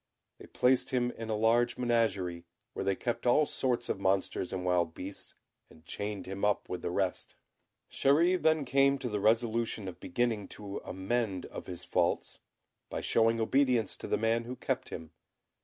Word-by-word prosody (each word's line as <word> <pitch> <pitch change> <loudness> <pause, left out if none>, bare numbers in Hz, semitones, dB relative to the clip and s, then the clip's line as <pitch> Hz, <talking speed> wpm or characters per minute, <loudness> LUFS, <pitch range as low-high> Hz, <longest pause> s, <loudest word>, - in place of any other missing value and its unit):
They - - -12
placed 125 0 +2
him 125 -1 +1
in 115 -1 -7
a 110 - +1
large 115 +3 +3
menagerie, 100 -8 0 0.3
where - - -3
they 100 - +1
kept 120 +4 -2
all 150 +5 +5
sorts 125 -4 0
of - - -2
monsters 95 -1 0
and 90 -1 -3
wild 85 -2 +1
beasts, 95 +2 -7 0.3
and 80 - -19
chained 100 +2 -4
him 95 +1 -6
up 105 -1 +1
with 90 - -4
the - - -2
rest. 90 0 -2 0.6
Chéri 170 +7 +3
then 160 -2 +3
came 140 +1 +4
to 130 - -4
the 105 -1 -1
resolution 115 -1 +1
of 95 - -7
beginning 110 +1 -1
to 100 -1 -6
amend 95 0 -2
of - - -8
his 90 -1 -6
faults, - - 0 0.5
by - - -3
showing 115 0 +3
obedience 125 -1 +2
to - - -6
the - - +1
man 115 +1 +1
who 125 +2 -5
kept - - -2
him. 80 -1 -7
110 Hz, 175 wpm, -31 LUFS, 95-120 Hz, 0.6 s, all